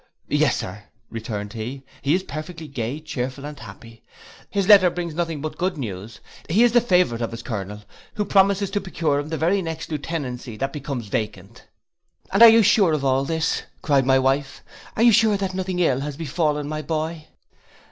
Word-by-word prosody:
'—'Yes, - - +2
sir,' 100 +3 -7 0.3
returned 110 -2 -5
he, 125 +4 -6 0.2
'he 140 +4 +2
is 185 - -1
perfectly 160 +1 -7
gay, 130 +1 -4
chearful, 135 -2 -5
and 150 -1 -8
happy. 115 +2 -12 0.5
His 200 -2 -1
letter 195 -4 +8
brings 170 -2 -4
nothing 165 -2 -2
but 155 +1 -5
good 180 -1 -1
news; 110 -3 -7 0.3
he 205 +9 +4
is 240 - +5
the 240 +1 +5
favourite 180 - +2
of 115 - -1
his 115 +1 -8
colonel, 105 -2 -5 0.3
who 210 - -1
promises 195 0 +3
to 205 0 -1
procure 160 -6 -1
him 145 +1 -5
the 160 - -2
very 180 +5 +2
next 165 -1 -5
lieutenancy 140 -7 -4
that 135 +3 -3
becomes 140 -5 -5
vacant!' 105 +1 -5 0.7
'And - - +3
are 235 - +12
you 225 0 +6
sure 200 -5 +4
of 145 -3 -1
all 135 0 +2
this,' 160 +2 -1 0.2
cried 135 -3 +2
my 130 0 +5
wife, 135 +1 0 0.3
'are 225 - +3
you 240 - +7
sure 220 -1 +4
that 195 -1 -3
nothing 185 -1 -3
ill 160 -8 +2
has 145 0 -5
befallen 150 -1 -1
my 155 0 -3
boy? 160 0 -3
150 Hz, 190 wpm, -23 LUFS, 125-180 Hz, 0.7 s, are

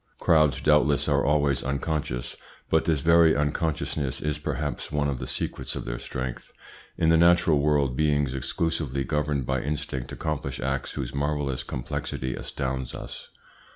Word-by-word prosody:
Crowds, 75 -5 +3
doubtless, 75 -1 +3
are - - +3
always 70 -1 +2
unconscious, 70 -2 -2 0.4
but 80 - +3
this 80 -4 +1
very 85 +1 +6
unconsciousness 75 -1 -1
is 75 0 -2
perhaps 75 0 -3
one 75 -1 +1
of 70 -3 -2
the - - -5
secrets 65 - -3
of - - -5
their - - -4
strength. 65 -1 -5 0.5
In 80 - +3
the 80 - +6
natural 85 -2 +5
world 70 -3 +2
beings 75 -2 +1
exclusively 70 +1 -1
governed 75 0 -1
by 65 0 0
instinct 65 -3 -3
accomplish 70 -4 -3
acts 65 +1 -2
whose 65 -3 -4
marvellous 70 -2 -1
complexity 65 0 -4
astounds 65 -2 -4
us. - - -8
70 Hz, 150 wpm, -26 LUFS, 65-75 Hz, 0.5 s, very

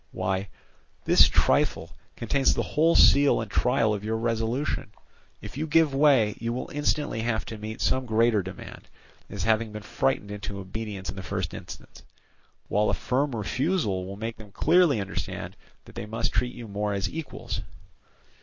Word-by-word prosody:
Why, 95 0 -2 0.6
this - - +7
trifle - - +1 0.2
contains 135 +4 +1
the - - 0
whole 160 +3 +2
seal 140 0 +6
and 110 -2 -5
trial 115 -3 +2
of 105 -1 -4
your 110 +1 -1
resolution. 115 +5 -1 0.5
If - - -9
you 155 +2 -2
give 160 -2 +3
way, 135 -7 +4
you 115 0 -2
will 125 - -5
instantly 145 -4 0
have 110 -1 -1
to 110 - -7
meet 110 +1 -6
some 130 -1 +1
greater 110 -1 +3
demand, 95 0 -10 0.4
as - - -4
having 110 0 +1
been 105 0 -7
frightened 105 -5 -1
into 105 -1 -6
obedience 100 0 -5
in - - -11
the - - -4
first 95 -2 -3
instance; - - -10 0.7
while 105 +1 +2
a - - +1
firm 135 0 -1
refusal 110 - -1
will 100 +1 -7
make 115 +2 -5
them 105 -2 -13
clearly 160 - +3
understand 95 -1 -5 0.3
that - - -14
they 105 - -6
must 115 +2 -2
treat 125 0 0
you 120 -2 -8
more 105 0 -2
as 100 -1 -1
equals. 160 -2 -5
110 Hz, 170 wpm, -26 LUFS, 105-135 Hz, 0.7 s, this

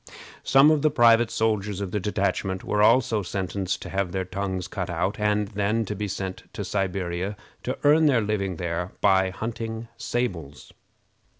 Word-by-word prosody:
Some 135 +3 +6
of 155 -2 +2
the 155 - +4
private 120 -4 +5
soldiers 105 -3 -1
of 100 -3 -4
the 105 - -1
detachment 95 -1 -1
were 105 - 0
also 115 -1 +4
sentenced 95 0 -3
to - - -7
have 95 -2 -1
their 95 0 -2
tongues 95 -1 -3
cut 90 -2 -4
out, 90 +5 -1
and 105 -1 +1
then 105 +2 0
to 105 - -3
be 105 +1 -3
sent 95 -1 -6
to - - -4
Siberia 95 0 -2 0.2
to 130 - -3
earn 155 +2 +5
their 130 -5 +3
living 100 -3 -1
there 85 +2 -3
by 95 -1 +4
hunting 115 +3 -5
sables. 90 - -4
100 Hz, 170 wpm, -25 LUFS, 95-115 Hz, 0.2 s, Some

